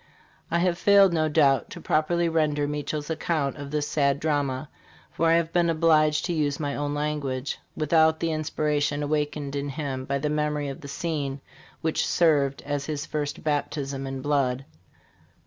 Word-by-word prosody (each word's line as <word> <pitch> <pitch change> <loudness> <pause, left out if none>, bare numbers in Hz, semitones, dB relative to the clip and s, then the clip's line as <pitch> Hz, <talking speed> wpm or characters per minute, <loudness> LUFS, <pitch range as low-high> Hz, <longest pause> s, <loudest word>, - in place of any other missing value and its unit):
"I 170 - +1
have 175 0 +1
failed, 200 -3 +6
no 155 -1 +1
doubt, 145 -3 +3
to - - -8
properly 170 +2 +1
render 150 -3 +1
Meachelle's 150 +1 -3
account 155 -3 -1
of 140 -1 -7
this 150 0 -1
sad 140 -2 +1
drama, 145 -2 -1 0.4
for 165 - +1
I 165 - +5
have 165 0 +1
been 175 -1 +3
obliged 155 -2 +3
to 175 - -1
use 145 -3 0
my 145 -2 -2
own 145 0 -2
language, 145 -3 -2 0.2
without 160 +1 +3
the 165 -1 0
in 155 0 -1
spiration 150 -1 0
awakened 145 -1 -2
in 140 0 -2
him 135 -3 -4
by 140 +1 -1
the 140 - -2
memory 150 -1 -1
of 135 - -7
the 140 - -8
scene 145 -3 -3 0.4
which 160 0 0
served 145 -5 +2
as 145 -1 -2
his 150 -1 -3
first 150 -1 -4
baptism 140 -2 -2
in 135 -1 -5
blood. 135 -3 0
150 Hz, 175 wpm, -26 LUFS, 140-160 Hz, 0.4 s, failed